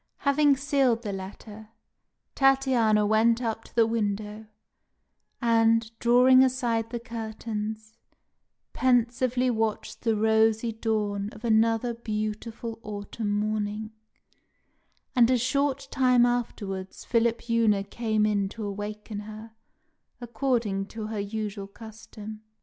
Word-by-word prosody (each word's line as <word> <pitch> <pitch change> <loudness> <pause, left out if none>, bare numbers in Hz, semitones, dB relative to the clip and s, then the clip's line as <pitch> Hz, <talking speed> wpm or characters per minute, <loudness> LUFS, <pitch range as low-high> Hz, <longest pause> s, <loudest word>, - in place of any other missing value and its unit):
Having 280 0 +4
sealed 270 -4 +1
the 205 - -3
letter, 205 +3 -9 0.6
Tatiana 260 -6 +3
went 225 +2 +3
up 225 -2 -3
to - - -18
the 230 -1 +5
window, 215 -1 -3 0.9
and, 225 -1 +3
drawing 250 +2 +6
aside 240 -3 0
the 240 0 -4
curtains, 220 -2 -5 0.8
pensively 250 0 +2
watched 220 -2 -2
the 225 -1 +1
rosy 220 +1 +2
dawn 210 -2 -2
of 215 +3 -10
another 225 +1 +2
beautiful 225 0 -5
autumn 205 +1 -5
morning; 210 +1 -2 1.2
and 240 -2 +5
a 255 - +4
short 275 +2 0
time 250 -2 +4
afterwards 205 -6 -3
Philipjewna 230 -3 +1
came 215 0 0
in 200 -2 +1
to 220 +1 -6
awaken 205 +1 -5
her, 215 +2 -9 0.7
according 235 -5 -1
to 220 0 -6
her 210 - -3
usual 205 -1 -4
custom. 215 0 -11
225 Hz, 110 wpm, -27 LUFS, 210-240 Hz, 1.2 s, drawing